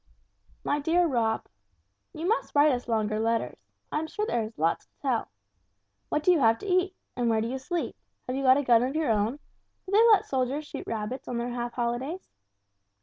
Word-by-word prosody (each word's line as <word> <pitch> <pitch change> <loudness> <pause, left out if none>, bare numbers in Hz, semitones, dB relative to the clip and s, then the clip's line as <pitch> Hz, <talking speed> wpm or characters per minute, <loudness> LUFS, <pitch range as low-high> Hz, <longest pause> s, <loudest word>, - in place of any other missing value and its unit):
"MY 290 - 0
DEAR 335 +4 +2
ROB: 230 -6 0 0.7
"You 325 +3 -4
must 445 -5 0
write 290 +1 +6
us 250 -2 -2
longer 215 -2 0
letters. 230 +1 -1 0.3
I - - 0
am 315 - -3
quite - - -10
sure 425 - -1
there 240 - 0
is 220 +1 -6
lots 165 +2 0
to - - -49
tell. 255 -5 -1 0.8
What 300 - 0
do 365 - +5
you 345 - +4
have 225 -3 +4
to - - -10
eat? 370 0 +1 0.2
And 245 -1 0
where 225 -1 +2
do 225 - -1
you 260 +2 -3
sleep? 340 +6 -3 0.3
Have 255 - -3
you 270 - -1
got 260 0 +6
a 285 - 0
gun 235 -3 +5
of 260 +4 -1
your 310 -6 +1
own? 215 +5 +1 0.5
Do 380 - -8
they 440 +3 +6
let 430 -4 +5
soldiers 265 +3 -1
shoot - - -8
rabbits 225 +4 -4
on 245 - -3
their 240 +1 -2
half 240 0 -4
holidays? 250 +9 -3
255 Hz, 215 wpm, -27 LUFS, 230-310 Hz, 0.8 s, write